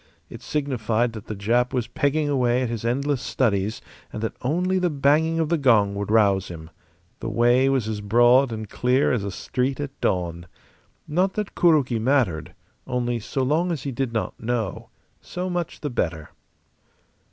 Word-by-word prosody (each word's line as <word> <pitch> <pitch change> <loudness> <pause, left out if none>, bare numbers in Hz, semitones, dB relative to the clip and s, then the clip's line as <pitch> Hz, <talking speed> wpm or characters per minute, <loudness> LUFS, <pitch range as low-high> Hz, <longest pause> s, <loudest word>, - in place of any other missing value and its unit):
It - - -9
signified 120 -5 -1
that 110 -1 -9
the 110 - -4
Jap 120 +6 +1
was 125 -3 0
pegging 150 +2 0
away 125 -3 +1
at 125 - -2
his 115 -2 -4
endless 135 +3 0
studies 105 -6 -1 0.3
and 110 - -5
that 110 - -2
only 180 +8 0
the 180 -1 +1
banging 150 +3 +2
of 160 -2 0
the 170 -1 +1
gong 110 -7 +4
would 100 0 -4
rouse 100 -4 +3
him. 80 -1 -9 0.5
The - - -4
way 120 +3 +3
was 130 -5 +1
as 105 -1 -3
broad 120 +5 +4
and 110 -1 -5
clear 125 +6 +1
as 120 -6 0
a 100 - -3
street 130 +7 -2
at 145 -2 -4
dawn. 85 -2 -1 0.6
Not 185 +5 +1
that 210 -2 -4
Kuroki 145 -9 +3
mattered; 100 - 0 0.3
only 120 -1 -1
so 130 +5 -2
long 160 +7 +1
as 160 -6 -3
he 140 - -3
did 130 -1 -2
not 110 -1 -3
know, 115 -4 -3 0.3
so 180 +1 -4
much 175 -2 -3
the 145 - -2
better. 80 -8 -2
125 Hz, 175 wpm, -24 LUFS, 110-145 Hz, 0.6 s, gong